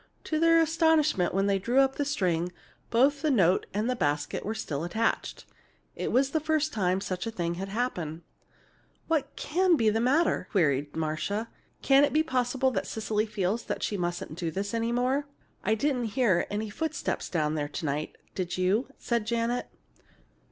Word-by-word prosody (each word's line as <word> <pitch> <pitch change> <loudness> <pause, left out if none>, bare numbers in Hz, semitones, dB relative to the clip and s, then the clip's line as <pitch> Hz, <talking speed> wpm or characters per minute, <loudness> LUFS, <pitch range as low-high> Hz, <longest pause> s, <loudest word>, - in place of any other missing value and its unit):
To 310 - -1
their 330 0 +5
astonishment, 320 - +3
when 195 +1 +1
they 200 -1 +2
drew 240 +7 +2
up 270 0 +3
the 285 - 0
string, 180 - 0 0.4
both 275 +5 +3
note 195 - +3
and 210 +3 -1
basket 145 0 -1
were 220 +2 -3
still 150 -7 -3
attached. 220 +7 -1 0.5
This - - -3
was 270 +2 +2
the 315 - +1
first 310 0 0
time 185 -3 +1
such 185 +2 -4
a - - 0
thing 170 -6 -2
had 190 +3 -5
happened. 180 -8 -3 0.8
"What 295 -4 0
can 360 +3 +2
be 225 -7 +3
the 220 - 0
matter?" 265 - +2
queried 145 -5 +1
Marcia. 160 +8 -2 0.3
"Can 275 +1 +6
it 290 - +2
be 310 +1 +4
possible 260 -2 +1
that - - -2
Cecily 215 0 -1
feels 210 +1 -1 0.2
she 210 - -1
mustn't 175 -3 -3
do 170 -3 -1
this 200 +5 -3
any 230 0 0
more?" 255 +4 +1 0.4
"I 215 +3 +2
didn't 250 0 0
hear 205 -9 +3
any 210 +1 -3
footsteps 315 +6 -3
down 155 -3 0
there 145 -2 -2
to 160 - -5
night, 150 +1 -2 0.2
did 180 -2 -3
you?" 190 +7 +1
said 235 -3 -1
Janet. 235 +1 0
220 Hz, 175 wpm, -28 LUFS, 180-270 Hz, 0.8 s, Can